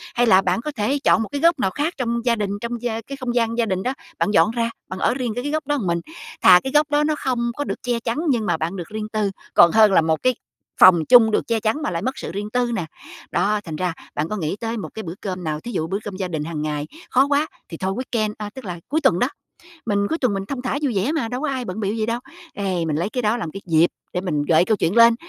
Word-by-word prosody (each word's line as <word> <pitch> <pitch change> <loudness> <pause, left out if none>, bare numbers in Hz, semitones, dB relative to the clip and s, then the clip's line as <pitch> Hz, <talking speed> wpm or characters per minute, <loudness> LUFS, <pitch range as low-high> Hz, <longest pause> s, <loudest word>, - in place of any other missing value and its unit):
hay 245 - +3
là 190 -3 +6
bạn 185 +4 0
có 300 - -4
thể 245 +7 0
chọn 225 - +4
một 205 - -7
cái 285 - -3
góc 335 -3 +4
nào 190 -5 +1
khác 300 - -1
trong 235 -1 -2
gia 235 -1 +3
đình, 205 -2 -2
trong 235 0 -4
gia 230 -2 -2
cái 275 +5 -8
không 245 -2 -3
gian 230 -1 +1
gia 235 - +2
đình 190 -3 -2
đó, 255 - -1 0.2
bạn 210 - +1
dọn 165 +1 +4
ra, 230 0 -1 0.2
bạn 185 - -5
ở - - +2
riêng 250 -3 -2
cái 245 - -3
cái 290 - -2
góc 310 -2 -2
đó 290 - +1
mình. 170 -2 0 0.4
Thà 180 -1 +8
cái 265 - -3
góc 295 0 +4
đó 295 0 +3
nó 305 0 +1
không 240 -2 -1
có 290 - -1
được - - -5
che 245 -2 0
chắn 230 +3 -3
nhưng 235 -5 +1
mà 160 - +1
bạn 160 +4 -3
được 175 -4 -6
riêng 215 0 -4
tư, 215 -2 -1 0.2
còn 170 - +7
hơn 215 0 +6
là - - +6
một 160 0 0
cái 255 -2 +2 0.4
phòng 170 -4 +7
chung 225 -3 +7
được - - 0
che 230 -1 +1
chắn 220 +8 -1
mà 300 - -2
lại 170 - -2
mất 260 +7 -2
sự - - -5
riêng 205 +3 -4
tư 245 -1 +1
nè. 175 -7 -2 0.5
Đó, 210 0 +1
thành 160 -5 -6
ra 180 +1 -1 0.2
bạn 150 +2 -1
có 215 - -2
nghĩ 160 +1 -2
tới 230 0 -3
một 210 - -5
cái 220 - -6
bữa 165 - -5
cơm 185 -3 -4
nào, 155 -1 -2
thí 235 - -7
dụ 160 -7 -2
bữa 195 +3 -1
cơm 205 -2 -6
gia 190 - -2
đình 160 -4 -3
hàng 155 -2 -4
ngày 150 -1 -3 0.2
khó 265 +2 +4
quá 290 +2 +2 0.2
thì 165 - -7
thôi 190 +2 -2
weekend 225 -4 -1
à, 210 -1 -5
tức 265 - -9
là 175 -3 -5
cuối 310 +5 0
tuần - - +3
đó. - - +3 0.6
Mình 200 -2 +1
cuối 320 - 0
tuần 250 -8 +1
mình 195 0 -3
thong 265 -3 -4
thả 255 +2 -2
vui 270 -6 0
vẻ 200 +10 +1
mà, 310 -8 -1
đâu 250 +4 -4
có 305 - -1
ai 260 -2 -3
bận 195 +1 -5
bịu 205 +1 -1
gì 220 -1 -1
đâu. 230 +1 -1 0.3
Ê, 185 -4 -1
mình 155 - -1
lấy 170 +6 -1
cái 250 - -2
đó 220 +1 +1
làm 170 -9 -4
cái 195 - -8
dịp 165 -1 +4 0.3
để 180 - -1
mình 150 -6 -1
gợi 165 +2 +4
câu 220 0 +2
chuyện 170 +3 0
lên, 230 0 +7
220 Hz, 300 wpm, -22 LUFS, 185-245 Hz, 0.6 s, Thà